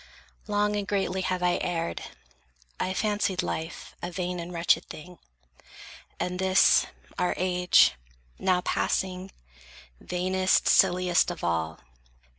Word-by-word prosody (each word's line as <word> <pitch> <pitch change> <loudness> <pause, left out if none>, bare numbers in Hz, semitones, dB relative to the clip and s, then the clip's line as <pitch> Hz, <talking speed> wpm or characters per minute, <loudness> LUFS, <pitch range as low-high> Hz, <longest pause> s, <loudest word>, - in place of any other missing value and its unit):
Long 210 0 +1
And 205 -1 -3
greatly 190 -2 -1
have 185 -1 -2
I 180 0 +2
erred. 170 -2 -2 0.8
I 185 - -1
fancied 205 -2 0
life 160 +1 -5
A 175 - -4
vain 180 0 -3
and 170 +1 -6
wretched 170 -1 +2
thing, 175 +3 -11 1.0
and 180 0 -3
this, 190 0 +4 0.3
our 180 - +1
age, 180 0 +4 0.5
Now 185 -1 +2
passing, 185 +1 -1 0.7
vainest, 185 +1 +1
silliest 180 -2 +4
of 175 - -6
all. 80 -2 -2
180 Hz, 115 wpm, -27 LUFS, 175-190 Hz, 1.0 s, this